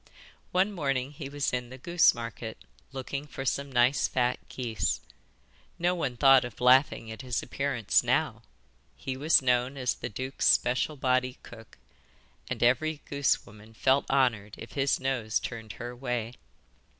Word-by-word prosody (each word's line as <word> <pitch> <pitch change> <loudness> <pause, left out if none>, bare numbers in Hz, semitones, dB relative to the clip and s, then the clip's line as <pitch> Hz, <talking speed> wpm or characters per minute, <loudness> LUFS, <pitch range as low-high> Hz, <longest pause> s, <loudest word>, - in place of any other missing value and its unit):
One 190 +3 +2
morning 135 -6 -1
he 145 -2 -7
was 145 -2 -2
in 125 -1 -2
the 130 - -9
goose 170 +3 +4
market, 115 -1 -6 0.3
looking 140 +2 -5
for 135 -1 -6
some 140 +2 -1
nice 125 +2 +3
fat 125 -1 0
geese. 115 -7 -2 0.8
No 175 +1 +1
one 135 -9 -3
thought 135 0 +6
of 120 -3 -8
laughing 125 -2 +4
at 110 - -7
his 125 -4 -2
appearance 135 -4 +1
now; - - 0 0.6
he 130 - -4
was 145 +1 +4
known 125 +2 +1
as 125 -2 0
the - - -6
duke's 130 +6 -2
special 130 +5 +2
body 130 -1 0
cook, 115 -2 -13 0.7
and - - -2
every 145 +6 +2
goose 140 -1 +1
woman 110 +2 -15
felt 135 +4 +2
honoured 115 -7 +1
if 115 - -10
his 140 0 +1
nose 125 -5 0
turned 110 -3 -7
her 120 +4 -7
way. 120 -2 -3
130 Hz, 155 wpm, -28 LUFS, 120-140 Hz, 0.8 s, thought